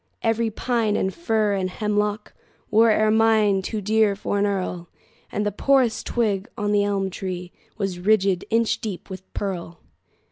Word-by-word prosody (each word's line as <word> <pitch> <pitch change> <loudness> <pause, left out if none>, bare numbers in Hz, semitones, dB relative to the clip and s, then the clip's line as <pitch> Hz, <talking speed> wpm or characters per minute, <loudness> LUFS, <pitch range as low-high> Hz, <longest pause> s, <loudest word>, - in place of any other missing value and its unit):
Every 225 0 +1
pine 225 -1 0
and 190 - 0
fir 220 -10 0
and 190 -2 -1
hemlockWore 210 +2 0
ermine 215 -2 +3
too 210 +3 -4
dear 215 0 +2
for 205 0 -2
an 205 - +2
earl, 180 -3 -3 0.4
And 210 - -1
the 205 - 0
poorest 255 +1 +2
twig 210 -4 0
on 205 -2 -1
the 205 -1 +3
elm 195 -1 -1
treeWas 180 0 -6
ridged 195 -3 +3
inch 230 0 +1
deep 200 -3 -6
with 190 0 -9
pearl. 175 -4 -4
205 Hz, 145 wpm, -23 LUFS, 190-220 Hz, 0.4 s, ermine